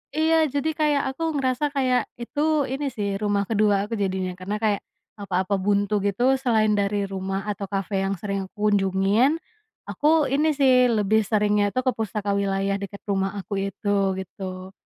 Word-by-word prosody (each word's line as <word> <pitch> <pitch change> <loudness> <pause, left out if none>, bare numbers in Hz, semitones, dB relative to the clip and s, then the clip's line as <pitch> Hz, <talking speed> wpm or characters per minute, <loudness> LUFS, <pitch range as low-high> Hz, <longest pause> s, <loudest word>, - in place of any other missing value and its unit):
iya 320 +1 +3 0.2
jadi 285 +2 0
kayak 295 -2 +2
aku 330 - -4 0.2
ngerasa 260 +2 0
kayak 255 -3 +2 0.2
itu 295 +3 0
ini 270 +3 -3
sih 205 -2 -3
rumah 205 -1 +1
kedua 210 -2 +3
aku 230 - -6
jadinya 190 -2 -1
karena 200 +3 -3
kayak, 210 -2 +1 0.4
apa-apa 190 0 -1
buntu 205 +1 +1
gitu 200 +4 0 0.2
selain 220 -5 +2
dari 200 0 0
rumah 195 +1 -4
atau 200 -1 -4
kafe 195 0 -1
yang 195 0 -1
sering 200 -1 -2
aku 210 0 -1
kunjungin. 200 - +2 0.5
Aku 305 0 +2
ini 300 +3 +2
sih 255 -3 +5
lebih 215 0 +2
seringnya 210 -1 +2
tuh 255 - +1
ke - - +5
pustaka 210 -2 -2
wilayah 195 0 0
dekat 200 0 -7
rumah 195 -1 0
aku 200 - -7 0.2
itu 205 +1 -1 0.2
gitu. 185 0 -7
205 Hz, 165 wpm, -24 LUFS, 195-255 Hz, 0.5 s, sih